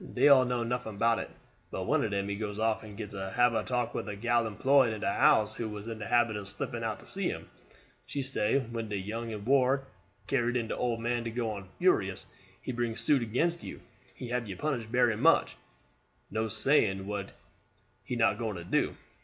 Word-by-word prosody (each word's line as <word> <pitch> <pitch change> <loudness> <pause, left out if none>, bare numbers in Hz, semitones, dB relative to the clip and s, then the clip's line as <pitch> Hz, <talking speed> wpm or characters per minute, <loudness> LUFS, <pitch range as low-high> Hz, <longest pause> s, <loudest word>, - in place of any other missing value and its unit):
Dey - - +6
all 130 -2 +7
know 125 -1 0
nuffin 115 -3 -3
bout 115 +1 +3
it; - - -5 0.4
but - - -4
one - - +2
of 110 - 0
dem 100 0 -1
he 100 - -2
goes 105 -1 -4
off 110 0 +1
and 105 -2 -11
gets 105 -2 -6
to 95 -1 -4
hab 120 -1 +4
a 110 -1 0
talk 120 -2 -1
with - - -3
a 105 - -4
gal 120 +2 +1
employed 130 +3 +3
in 105 - -6
de 100 - 0
house 110 0 +4
who 110 0 -4
was 105 0 -7
in 115 -1 -5
de 105 - -5
habit 120 -2 +3
of 100 -1 -5
slipping 95 +1 -4
out - - -2
to - - -16
see - - -1
him. - - -6 0.6
She 140 - -3
say 130 -3 +1
when 115 -4 -4
de 105 - -2
young 115 +4 -4
un 105 -2 -6
war 135 +1 +3 0.4
carried 120 +1 +1
in 115 -2 -2
de - - -1
old 120 -2 -1
man 120 0 0
go 115 -3 -1
on 100 -3 -7
furious; 95 - +2 0.4
he - - -3
bring 120 -2 -2
suit 120 +4 +2
against 165 +10 0
you, - - -7 0.4
he 125 - -7
hab 120 -2 -1
you 95 - -5
punished 120 -4 -2
berry 120 -2 +3
much - - +3 0.8
no 110 +2 0
saying 100 -5 +2
what 100 -1 -4 0.7
he 125 - -4
not 115 0 +2
going 110 -3 -2
to 85 - -6
do. 85 - 0
115 Hz, 220 wpm, -30 LUFS, 105-125 Hz, 0.8 s, all